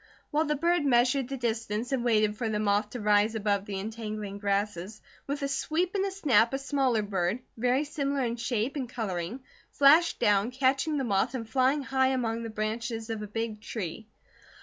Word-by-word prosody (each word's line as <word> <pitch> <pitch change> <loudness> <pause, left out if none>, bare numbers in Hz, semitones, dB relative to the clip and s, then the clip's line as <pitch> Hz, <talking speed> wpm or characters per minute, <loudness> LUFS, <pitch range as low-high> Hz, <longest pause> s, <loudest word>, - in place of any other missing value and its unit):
While 305 +2 +2
the 300 0 0
bird 340 +2 +2
measured 255 0 +3
the 270 +1 -4
distance 230 -1 -2
and 260 -3 0
waited 215 -3 +2
for 225 0 -2
the 210 -1 -1
moth 205 0 +1
to 245 - -6
rise 210 +1 +3
above 205 -2 0
the 195 -2 -4
entangling 215 -1 -5
grasses, 200 0 -2 0.3
with 285 +1 -3
a - - +1
sweep 320 +6 -1
and 390 -1 +1
a 395 - 0
snap 270 - +3
a - - 0
smaller 265 -4 +1
bird, 190 0 -1 0.2
very 250 +4 +1
similar 280 -2 -1
in 235 -1 -1
shape 235 +2 -2
and 260 -5 -3
colouring, 210 0 -4 0.3
flashed 310 +5 +5
down, 205 -1 +3
catching 270 +4 +1
the 275 - 0
moth 225 +2 +1
and 230 -3 -4
flying 265 +4 +2
high 265 0 +2
among 235 -3 -1
the 230 - -5
branches 225 +1 -3
of 220 -1 -3
a 210 - -5
big 220 0 -4
tree. 210 -1 -5
230 Hz, 195 wpm, -28 LUFS, 210-270 Hz, 0.3 s, flashed